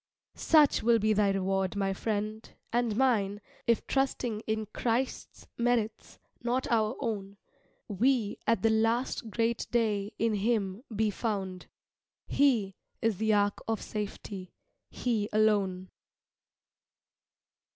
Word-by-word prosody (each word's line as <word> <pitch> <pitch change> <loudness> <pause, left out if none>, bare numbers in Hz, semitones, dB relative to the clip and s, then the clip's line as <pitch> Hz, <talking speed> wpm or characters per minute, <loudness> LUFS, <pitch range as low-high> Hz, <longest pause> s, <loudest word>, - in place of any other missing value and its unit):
Such 305 -3 +4
will 235 0 +4
be 215 0 +2
thy 205 -1 +3
reward, 195 -1 0
my 195 -1 0
friend, 215 +2 -3 0.2
and 235 -3 +1
mine, 210 -6 +2 0.3
If 230 -1 +2
trusting 255 -5 0
in 220 0 -1
Christ's 245 +2 -2
merits, 235 -2 0 0.2
not 245 +2 0
our 220 0 +2
own, 200 -5 -3 0.5
We 220 +1 +1
at 230 -5 +2
the 225 - +4
last 225 +1 +1
great 230 +1 0
day 215 -4 0
in 230 -1 +1
him 205 -1 0
be 215 0 +2
found; 195 -4 -3 0.6
He 235 -9 +2 0.3
is 225 -4 0
the 220 +1 +2
ark 205 0 +2
of 225 -1 0
safety 200 -3 -6 0.3
He 220 -4 -1
alone. 200 -4 +1
220 Hz, 120 wpm, -30 LUFS, 200-235 Hz, 0.6 s, Such